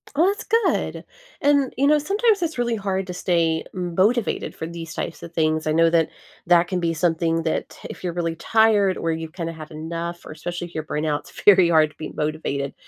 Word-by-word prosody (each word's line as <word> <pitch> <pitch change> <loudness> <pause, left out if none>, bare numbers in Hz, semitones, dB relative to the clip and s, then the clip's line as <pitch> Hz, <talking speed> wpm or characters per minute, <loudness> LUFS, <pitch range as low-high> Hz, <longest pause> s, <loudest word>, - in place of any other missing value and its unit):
Oh, 325 - +4
that's 405 +1 -1
good, 455 -4 0 0.4
and, 285 -2 +3
you 275 - +2
know, 300 +1 +5
sometimes 405 +5 +2
it's 325 -4 -2
really 240 -1 0
hard 195 -2 -2
to 180 - -5
stay 165 -3 +1
motivated 185 +6 0
for 160 - -5
these 165 -1 -7
types - - -5
of 170 - -10
things, 155 -1 +1
I 155 - +2
know 165 +1 +4
that 165 -1 +2 0.4
that 175 0 +5
can 185 - -1
be 170 -1 0
something 165 0 +1
that 160 - -3
if - - -9
you're 175 - -2
really 165 -1 -2
tired 210 -1 +3
or 165 - -1
you 160 0 -4
kinda 165 0 -5
have 155 -1 -10
enough 170 +2 -5
or - - -9
especially 175 +3 -5
if 170 - -19
you're 155 - -2
burnt 150 0 -3
out, 150 -1 0
it's - - -13
very 190 -4 +7
hard 155 -2 +4
to - - -27
be 155 - -6
motivated, 150 -2 -2
170 Hz, 220 wpm, -23 LUFS, 160-205 Hz, 0.4 s, very